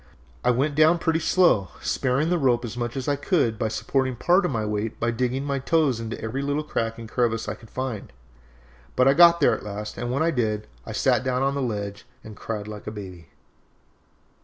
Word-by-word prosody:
I -, -, +3 dB
went 135 Hz, +5 st, +1 dB
down 155 Hz, +3 st, +5 dB
pretty 165 Hz, -1 st, 0 dB
slow, 170 Hz, -, +3 dB
sparing 135 Hz, +6 st, 0 dB
the 175 Hz, -, +2 dB
rope 125 Hz, -3 st, +2 dB
as 115 Hz, 0 st, -6 dB
much 120 Hz, +1 st, -3 dB
as 130 Hz, -, -4 dB
I 145 Hz, -, +2 dB
could 140 Hz, -, 0 dB
by 110 Hz, -, +1 dB
supporting 130 Hz, +3 st, -1 dB
part 180 Hz, -, +3 dB
of 180 Hz, -, 0 dB
my 110 Hz, -3 st, -1 dB
weight 105 Hz, +1 st, -3 dB
by 115 Hz, +1 st, +1 dB
digging 125 Hz, +3 st, -1 dB
my 140 Hz, -1 st, -1 dB
toes 140 Hz, -3 st, +1 dB
into 115 Hz, 0 st, -5 dB
every 115 Hz, +5 st, -3 dB
little 145 Hz, +2 st, -1 dB
crack 115 Hz, -6 st, -2 dB
and 115 Hz, -1 st, -8 dB
crevice 115 Hz, -1 st, 0 dB
I -, -, -2 dB
could 115 Hz, -, -15 dB
find, 130 Hz, -5 st, -5 dB, 0.8 s
but 130 Hz, -, +4 dB
I 135 Hz, -, +6 dB
got 170 Hz, +2 st, +7 dB
there -, -, +5 dB
at -, -, -8 dB
last, 105 Hz, +1 st, -6 dB
and 120 Hz, 0 st, -3 dB
when 140 Hz, +5 st, +1 dB
I 165 Hz, -, +2 dB
did, 110 Hz, -6 st, -1 dB, 0.2 s
I -, -, -5 dB
sat -, -, +2 dB
down 130 Hz, 0 st, 0 dB
on 135 Hz, 0 st, +1 dB
the 140 Hz, -, -2 dB
ledge 105 Hz, -4 st, -4 dB, 0.2 s
and 110 Hz, -, -10 dB
cried 105 Hz, -1 st, -5 dB
like 105 Hz, -1 st, -9 dB
a -, -, -3 dB
baby. 95 Hz, -5 st, -9 dB
125 Hz, 220 wpm, -24 LUFS, 110-140 Hz, 0.8 s, got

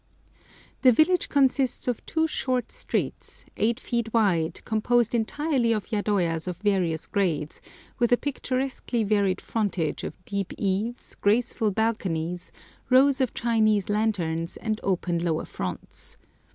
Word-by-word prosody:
The 255 Hz, -, +7 dB
village 315 Hz, +8 st, +3 dB
consists 265 Hz, -3 st, +2 dB
of 245 Hz, -3 st, -1 dB
two 320 Hz, 0 st, +1 dB
short 255 Hz, -5 st, -1 dB
streets, -, -, -3 dB
8 230 Hz, +3 st, +1 dB
feet 235 Hz, -3 st, -2 dB
wide 190 Hz, -8 st, +1 dB
composed 230 Hz, +1 st, +2 dB
entirely 240 Hz, +1 st, +1 dB
of 215 Hz, +1 st, -4 dB
yadoyas 185 Hz, -6 st, 0 dB
of 180 Hz, -2 st, -3 dB
various 180 Hz, -5 st, 0 dB
grades, 160 Hz, -7 st, -1 dB, 0.4 s
with 240 Hz, -1 st, +2 dB
a 245 Hz, -, +6 dB
picturesquely 260 Hz, -3 st, -2 dB
varied 200 Hz, -3 st, +1 dB
frontage 195 Hz, -8 st, -1 dB
of -, -, -5 dB
deep 200 Hz, -2 st, -3 dB
eaves, 205 Hz, +5 st, -2 dB
graceful 220 Hz, +1 st, +1 dB
balconies, 180 Hz, -5 st, -1 dB, 0.4 s
rows 265 Hz, +1 st, +5 dB
of 260 Hz, -, 0 dB
Chinese 215 Hz, -4 st, +2 dB
lanterns, 185 Hz, -6 st, -1 dB
and 215 Hz, -1 st, -2 dB
open 175 Hz, -3 st, 0 dB
lower 160 Hz, -2 st, 0 dB
fronts. 90 Hz, -2 st, -6 dB
215 Hz, 125 wpm, -26 LUFS, 185-245 Hz, 0.4 s, The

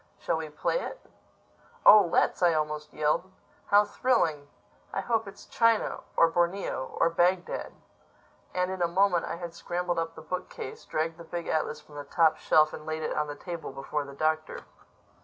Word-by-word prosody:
Shall -, -, -1 dB
we 160 Hz, -1 st, -5 dB
play 150 Hz, -, -1 dB
it?" -, -, -6 dB, 0.9 s
"Oh, 210 Hz, -, +10 dB
let's!" -, -, +2 dB
I 175 Hz, -2 st, +4 dB
almost 150 Hz, -1 st, -2 dB
yelled. 155 Hz, +5 st, 0 dB, 0.4 s
"How 205 Hz, +1 st, +5 dB
thrilling! 170 Hz, -, +1 dB, 0.4 s
I -, -, -2 dB
hope 225 Hz, 0 st, 0 dB
it's 200 Hz, -, -11 dB
China—or 230 Hz, -6 st, +2 dB
Borneo—or 170 Hz, -3 st, 0 dB
Bagdad." 175 Hz, +2 st, 0 dB, 0.8 s
And 180 Hz, 0 st, -1 dB
in 190 Hz, -1 st, -5 dB
a 175 Hz, -, +3 dB
moment 180 Hz, 0 st, +2 dB
I -, -, -4 dB
had 170 Hz, -1 st, -7 dB
scrambled 175 Hz, 0 st, -2 dB
up 165 Hz, 0 st, -3 dB
the 160 Hz, -, -10 dB
bookcase, 180 Hz, -5 st, -6 dB
dragged 160 Hz, +1 st, -2 dB
the -, -, -8 dB
big 170 Hz, +1 st, -5 dB
atlas 155 Hz, -, -1 dB
from 145 Hz, -, -14 dB
the 145 Hz, -, -5 dB
top 160 Hz, +2 st, +3 dB
shelf 155 Hz, 0 st, +3 dB
and -, -, -7 dB
laid 155 Hz, 0 st, -3 dB
it -, -, -2 dB
on 150 Hz, -, 0 dB
the 145 Hz, -, -6 dB
table 170 Hz, +1 st, -6 dB
before 135 Hz, +2 st, -3 dB
the 140 Hz, 0 st, -10 dB
Doctor. 155 Hz, +1 st, -1 dB
165 Hz, 175 wpm, -28 LUFS, 155-180 Hz, 0.9 s, Oh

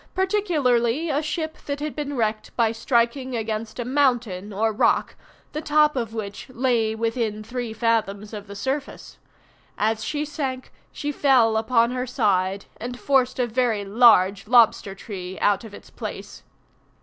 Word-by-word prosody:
particularly 315 Hz, -, +1 dB
a 290 Hz, +2 st, +1 dB
ship 315 Hz, +1 st, -4 dB
that 285 Hz, 0 st, -2 dB
had 300 Hz, 0 st, -4 dB
been 290 Hz, -2 st, -4 dB
wrecked 215 Hz, -1 st, -1 dB
by 230 Hz, -2 st, +2 dB
striking 240 Hz, +2 st, 0 dB
against 220 Hz, -1 st, -4 dB
a 240 Hz, -, -3 dB
mountain 245 Hz, -8 st, 0 dB
or 220 Hz, +2 st, 0 dB
rock, 210 Hz, -, +2 dB, 0.4 s
the 305 Hz, -, -4 dB
top 300 Hz, -1 st, +3 dB
of 230 Hz, -4 st, -2 dB
which 215 Hz, +1 st, -6 dB
lay 240 Hz, -3 st, 0 dB
within 225 Hz, -1 st, -2 dB
three 245 Hz, 0 st, -4 dB
fathoms 220 Hz, -2 st, -1 dB
of 205 Hz, -1 st, -7 dB
the 200 Hz, -, -9 dB
surface. 265 Hz, +8 st, -4 dB, 0.6 s
As 220 Hz, +1 st, 0 dB
she 300 Hz, 0 st, -2 dB
sank 270 Hz, -4 st, -4 dB, 0.2 s
she 295 Hz, 0 st, -3 dB
fell 255 Hz, -6 st, +3 dB
upon 230 Hz, +1 st, +2 dB
her 250 Hz, 0 st, -3 dB
side, 195 Hz, -5 st, 0 dB
and 245 Hz, +1 st, -6 dB
forced 260 Hz, -2 st, +2 dB
a 250 Hz, -, +2 dB
very 230 Hz, -3 st, 0 dB
large 200 Hz, -2 st, +4 dB
lobster 230 Hz, -4 st, +4 dB
tree 190 Hz, -2 st, -7 dB
out 205 Hz, +2 st, +2 dB
of 220 Hz, -, -10 dB
its -, -, -13 dB
place. -, -, -7 dB
235 Hz, 155 wpm, -23 LUFS, 215-265 Hz, 0.6 s, large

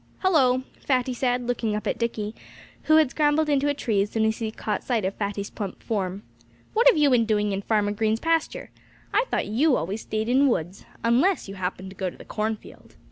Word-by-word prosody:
"Hullo!" 260 Hz, -9 st, +3 dB, 0.2 s
Fatty 255 Hz, -2 st, 0 dB
said, 245 Hz, 0 st, 0 dB
looking 230 Hz, -3 st, -1 dB
up 210 Hz, -, -4 dB
at -, -, -1 dB
Dickie, 220 Hz, -2 st, -2 dB, 0.5 s
who 310 Hz, -, +5 dB
had 310 Hz, -4 st, +5 dB
scrambled 300 Hz, +1 st, +2 dB
into 285 Hz, 0 st, +2 dB
a 285 Hz, -, 0 dB
tree 215 Hz, -7 st, 0 dB
as 205 Hz, -, -1 dB
soon 220 Hz, 0 st, 0 dB
as 220 Hz, 0 st, 0 dB
he 225 Hz, -2 st, -2 dB
caught 215 Hz, -1 st, -3 dB
sight 230 Hz, -6 st, 0 dB
of 190 Hz, -, -1 dB
Fatty's 200 Hz, -1 st, -4 dB
plump 200 Hz, -4 st, -6 dB
form. 195 Hz, -2 st, -2 dB, 0.5 s
"What 465 Hz, +3 st, +4 dB
have -, -, +7 dB
you 295 Hz, -2 st, +4 dB
been 235 Hz, -2 st, +4 dB
doing 210 Hz, -1 st, +1 dB
in 195 Hz, 0 st, -2 dB
Farmer 205 Hz, -1 st, +1 dB
Green's 220 Hz, +1 st, 0 dB
pasture! 330 Hz, +2 st, -1 dB, 0.4 s
I 435 Hz, +4 st, +3 dB
thought -, -, 0 dB
you 255 Hz, +7 st, +2 dB
always 195 Hz, +7 st, -3 dB
stayed 215 Hz, 0 st, -3 dB
in 250 Hz, +2 st, +3 dB
the 285 Hz, -, +5 dB
woods 180 Hz, -4 st, -2 dB, 0.2 s
unless 255 Hz, -, +2 dB
you 195 Hz, -, -7 dB
happened 190 Hz, 0 st, -4 dB
to -, -, -13 dB
go 190 Hz, -1 st, -2 dB
to -, -, -14 dB
the -, -, -12 dB
cornfield." 215 Hz, 0 st, -5 dB
225 Hz, 220 wpm, -25 LUFS, 205-270 Hz, 0.5 s, have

